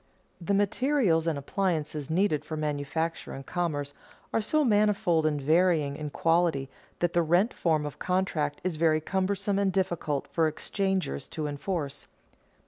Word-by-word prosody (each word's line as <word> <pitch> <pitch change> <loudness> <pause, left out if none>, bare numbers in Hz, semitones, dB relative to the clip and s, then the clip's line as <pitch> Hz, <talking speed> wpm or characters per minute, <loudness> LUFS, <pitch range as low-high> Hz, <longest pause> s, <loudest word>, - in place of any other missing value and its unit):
_ - - -11
The 200 - +3
materials 205 - +2
and 160 -3 0
appliances 150 -2 -2
needed 160 -3 +1
for 155 +1 -5
manufacture 155 +2 -2
and 135 0 -8
commerce 150 -5 -2 0.4
are 225 - +2
so 300 +8 +2
manifold 205 -7 +3
and 150 -1 0
varying 155 -1 +2
in 150 0 -5
quality 165 -4 +1 0.3
that 175 -1 +1
the 175 - +4
rent 175 +8 +2
form 155 -3 +1
of 145 - -7
contract 175 -6 -1
is 180 -3 -2
very 155 -1 +3
cumbersome 195 +4 -1
and 200 -1 +2
difficult 175 -7 -1
for 165 -1 +2
exchangers 190 - -2
to 155 - -4
enforce. 145 -1 -4
165 Hz, 150 wpm, -28 LUFS, 150-190 Hz, 0.4 s, the